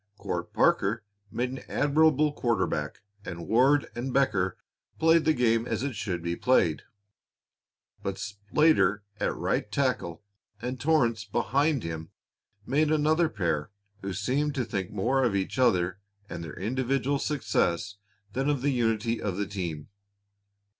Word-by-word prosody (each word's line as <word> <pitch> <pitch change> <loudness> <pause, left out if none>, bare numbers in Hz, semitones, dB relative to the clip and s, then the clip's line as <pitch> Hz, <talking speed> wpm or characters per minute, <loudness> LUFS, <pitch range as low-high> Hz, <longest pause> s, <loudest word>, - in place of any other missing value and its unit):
Court - - -4
Parker 105 +2 +2 0.3
made 125 +1 -1
an 130 - -5
admirable 150 0 +3
quarter 120 -5 +1
back, - - -4 0.2
and 85 -4 -7
Ward 135 +5 +4
and 125 +3 -4
Becker 100 -10 +1 0.4
played 165 0 +4
the 155 - +4
game 115 -1 +2
as 110 +2 -2
it 140 -4 -2
should 90 -6 -3
be 85 0 -1
played. 90 -11 +2 1.2
But 100 -1 -3
Slater 105 - +2 0.2
at - - 0
right 105 - -1
tackle 110 -9 -1 0.4
and 125 +3 -4
Torrance 125 -8 +2
behind 140 +3 +1
him 80 -1 -5 0.6
made 150 +5 +2
another 155 +2 +3
pair 80 -7 -1 0.3
who 100 - -4
seemed 130 +10 -1
to 130 -3 0
think 95 -5 -3
more 125 +7 +1
of 115 -5 +1
each 95 +6 -2
other 90 -7 +2 0.3
and 85 - -6
of 80 - -6
their - - -10
individual 130 +6 0
success 100 - 0 0.4
than 135 +3 0
of 140 -3 0
the 145 - +2
unity 115 -2 0
of 95 -3 -2
the 100 - 0
team. 85 -7 -5
115 Hz, 145 wpm, -28 LUFS, 100-140 Hz, 1.2 s, Ward